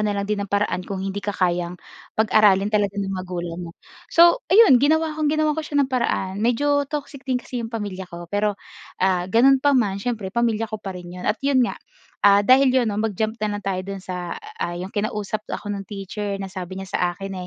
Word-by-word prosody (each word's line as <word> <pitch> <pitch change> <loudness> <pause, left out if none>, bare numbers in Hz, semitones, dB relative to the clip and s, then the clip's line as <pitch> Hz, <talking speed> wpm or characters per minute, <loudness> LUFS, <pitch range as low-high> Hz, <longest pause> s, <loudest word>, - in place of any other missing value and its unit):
na 210 -1 0
lang 200 - -1
din 210 0 -2
ng 200 - -4
paraan 200 -2 0
kung 195 -1 -4
hindi 195 +1 -3
ka 205 -1 -4
kayang 175 -1 0 0.4
pag-aralin 210 -2 +4
talaga 205 -1 +1
ng 195 -1 -2
magulang 180 -2 -5
mo. 170 - -7 0.4
So, 345 +8 +6
ayun. 385 - +7
Ginawa 315 +3 +2
kong 305 -1 +1
ginawan 310 0 +2
ko 315 - -2
siya 300 -1 -5
ng - - -6
paraan. 195 -5 -1
Medyo 285 +5 +1
toxic 290 -2 -5
din 255 - +2
kasi 250 -1 -5
'yung 225 - -4
pamilya 205 -5 -5
ko, 170 0 -8
pero, 205 +3 -1 0.5
ah, 185 -1 +1
gano'n 260 +6 +5
pa 285 -1 +3
man, 200 -5 +1
siyempre 210 -4 -3
pamilya 230 -1 +1
ko 215 -1 -6
pa 195 -3 -6
rin 175 -1 -9
'yun 180 0 -4
at 210 - +2
'yun 275 -2 +3
nga. 240 - 0 0.4
Ah, 200 0 +5
dahil 260 +3 +6
'yun 255 -1 +3
'no, 210 -2 -1
mag-jump 220 +1 -2
na 215 - 0
lang 205 - -9
tayo 190 -1 -1
do'n 195 +1 -6
sa, 180 -2 -5 0.2
ah, 175 0 -2
'yung 185 +3 -6
kinausap 210 0 -2
ako 205 - -4
'nung 195 -1 -6
teacher 200 0 -4
na 195 -1 -7
sabi 185 -1 -6
niya 190 0 -8
sa - - 0 0.2
akin, 195 0 -6
205 Hz, 225 wpm, -22 LUFS, 190-245 Hz, 0.5 s, ayun